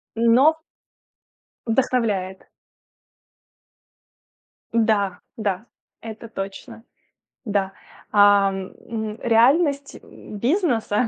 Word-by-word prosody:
Но 245 +8 +4 1.1
Вдохновляет. 225 -6 -1 2.2
Да, 215 -5 +1 0.2
да, 205 -1 -3 0.3
это 225 0 -9
точно. 220 +3 -8 0.6
Да. 200 -3 -1 0.4
А, 205 -1 +5
м, 215 +3 -6
реальность, 280 +5 +2
м, 210 - -12
бизнеса 245 - +1
225 Hz, 65 wpm, -22 LUFS, 200-245 Hz, 2.2 s, А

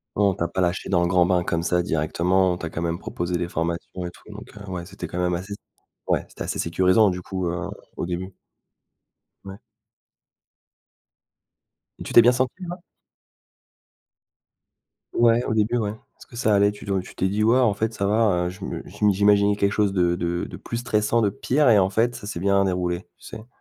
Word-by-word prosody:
Ouais, 105 - +2
on 100 - +4
t'a 85 -1 -2
pas 90 +3 -2
lâchée 90 +1 -1
dans 90 -3 +3
le 85 - +2
grand 90 -1 +3
bain 90 -1 +2
comme 85 -2 -1
ça 90 0 +1
directement. 90 +3 +1
On - - -4
t'a 85 - -5
quand 80 - -4
même 85 0 -1
proposé 85 0 -3
des 85 - -2
formations 85 +2 -3
et - - -4
tout, - - -19
donc - - -10
heu, 100 -1 -9
ouais, 85 -2 -5
c'était 95 -1 -8
quand 85 +2 -5
même 90 0 +1
assez 95 +4 -6
s - - -7 0.5
ouais, - - +1
c'était - - -7
assez - - -4
sécurisant, 95 +5 +3
du 90 -1 -4
coup, 95 -1 -4
heu, 85 +1 -4 0.3
au - - -2
début? 90 +2 -5 1.1
Ouais. 95 0 -8 2.4
Et - - -6
tu - - -7
t'es - - +10
bien 120 +2 +6
sentie 130 +9 -2
là? 175 - -5 2.4
Ouais, 120 0 +4
au - - -1
début, 110 +2 +1
ouais. 105 -3 -1
Est-ce 110 - -16
que - - -15
ça 110 -3 +1
allait? 100 +1 +4
Tu 105 - -12
do 100 -2 0
tu 90 - -10
t'es 95 - 0
dit: 105 +3 0
«Ouais, 115 +3 +4
en 120 -5 +3
fait, 110 +3 -2
ça 100 - -2
va. 105 -4 +2
Heu, - - -2
je 95 +2 -10
me - - -5
je - - -3
m'i 105 - +5
j'imaginais 100 +1 +4
quelque 100 -1 +1
chose 100 -1 +1
de 90 -2 +2
de 85 0 -2
de - - -9
plus 115 - -5
stressant, 115 -1 +1
de 105 - +3
pire" 130 +7 +1
et 110 -3 +6
en 95 0 +2
fait, 115 +4 +1
ça 105 - -8
s'est 105 -5 -4
bien 100 +1 +3
déroulé, 90 -1 -1 0.2
tu - - -18
sais? 110 +1 -10
95 Hz, 220 wpm, -23 LUFS, 90-105 Hz, 2.4 s, t'es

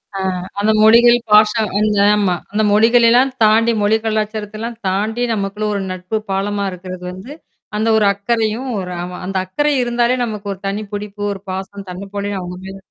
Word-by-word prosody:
அ - - -3 0.4
அந்த 215 +2 +2
மொழிகள், 235 +2 +7
பாச 210 0 +7 0.3
அந்த 210 -1 +1 0.2
ஆமா. 200 -4 +1 0.2
அந்த 215 +1 +1
மொழிகள 230 +3 +5
எல்லாம் 255 +3 +4
தாண்டி 225 +2 +4
மொழி 210 +2 +3
கலாச்சாரத்தை 215 -1 -2
எல்லாம் 230 +1 -5
தாண்டி, 215 +5 -1
நமக்குள்ள 200 0 -3
ஒரு 200 - -2
நட்பு 185 +4 -3
பாலமா 200 +1 -1
இருக்கிறது 180 0 -8
வந்து, 190 +10 -9 0.4
அந்த 220 +1 0
ஒரு 215 - +3
அக்கறையும், 225 +4 -1
ஒரு 180 -1 -5
ஆமா 180 +1 -6
அந்த 190 +1 -3
அக்கரை 295 +11 0
இருந்தாலே 240 +1 +1
நமக்கு 210 -3 -6
ஒரு 190 - -14
தனிப்புடுப்பு, 205 0 -5
ஒரு 195 - -10
பாசம், 195 +1 -6
தன்னைப் 195 +2 -9
போலவே 200 0 -2
அவுங்க 180 0 -7
மேல 190 0 -8
210 Hz, 170 wpm, -18 LUFS, 195-225 Hz, 0.4 s, மொழிகள்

